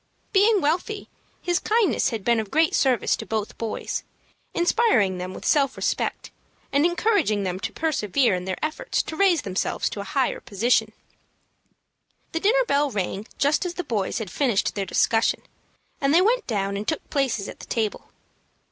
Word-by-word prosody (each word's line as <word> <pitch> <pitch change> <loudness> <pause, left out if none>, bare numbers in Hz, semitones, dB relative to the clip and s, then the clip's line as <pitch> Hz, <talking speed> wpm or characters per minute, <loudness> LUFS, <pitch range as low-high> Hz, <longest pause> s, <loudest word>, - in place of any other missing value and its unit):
Being 410 0 +4
wealthy, 350 +8 -1 0.3
his 350 -1 +1
kindness 425 - +2
had 225 -4 -4
been 235 -1 +3
of 215 -2 -4
great 320 +5 +2
service 255 -6 +2
to - - -6
both 220 -1 -3
boys, 225 -2 -3 0.5
inspiring 345 - +2
them 180 +1 -5
with - - -9
self 275 -3 +2
respect, - - -2 0.4
and 285 +4 +4
encouraging 350 - +1
them 185 -1 -2
to - - -4
persevere 265 - +1
in 180 0 -2
their 190 -1 -3
efforts 310 - -2
to 315 - -6
raise 360 -4 +3
themselves 190 -1 -1
to - - -5
a - - -3
higher 255 +7 0
position. 220 +1 +1 1.4
The 325 - -1
dinner - - +3
bell 285 -6 +2
rang 200 -1 -3
just 290 +5 +2
as 355 -1 -4
the 360 - -3
boys 210 - -2
had 215 -7 -5
finished 245 -8 +1
their 195 -2 -3
discussion, 225 +4 +2 0.6
and 280 +2 +3
they 350 - +6
went 475 +3 +2
down 200 -3 -1
and 210 +2 -5
took 315 - -2
places 265 -8 0
at - - -9
the - - -11
table. 220 -3 -2
260 Hz, 175 wpm, -24 LUFS, 205-345 Hz, 1.4 s, they